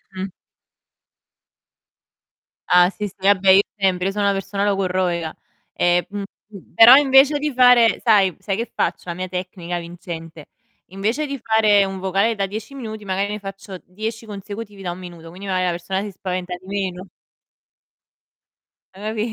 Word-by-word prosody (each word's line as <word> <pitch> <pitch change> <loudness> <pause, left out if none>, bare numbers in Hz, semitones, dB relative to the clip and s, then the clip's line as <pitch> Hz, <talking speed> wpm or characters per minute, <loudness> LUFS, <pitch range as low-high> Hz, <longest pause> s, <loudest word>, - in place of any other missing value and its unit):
Mh-mh. 190 +1 -4 2.4
Ah 180 0 +5
sì, 210 +1 -5
sì, - - -14
vabbè 195 0 +3
io 195 - +7 0.2
sempre, 190 -1 +1
io - - 0
sono 205 +1 -2
una 200 - +3
persona 195 +1 -3
logorroica. 185 -4 -1 0.4
Ehm, 175 0 +2 0.4
mhmm, 200 -4 -14
però 235 +3 +9
invece 280 +1 +5
di 295 -1 -2
fare 245 -3 +5
sai 200 -6 +4
sai 195 -2 -2
che 235 - -4
faccio, - - -1
la - - -2
mia 185 +1 -5
tecnica 180 -1 -5
vincente? 170 -2 -9 0.4
Invece 220 - -2
di 275 -1 -5
fare 215 -3 +4
un 190 -1 -5
vocale 195 +4 +1
da 195 -1 -1
10 215 +6 -7
minuti, 220 -5 -7
magari 195 +2 -1
ne 210 - -5
faccio 195 -1 -9
10 220 +4 -6
consecutivi 205 0 -8
da 175 -2 -3
1 180 - -8
minuto, 170 -2 -11
quindi 190 +4 -10
magar 185 -1 0
la 175 - +1
persona 185 +3 -3
si 205 - -6
spaventa 185 -1 -4
di 180 +1 -16
meno. 190 -2 -4 1.9
Ha 190 - -15
capi 215 0 -2
195 Hz, 160 wpm, -21 LUFS, 180-215 Hz, 2.4 s, però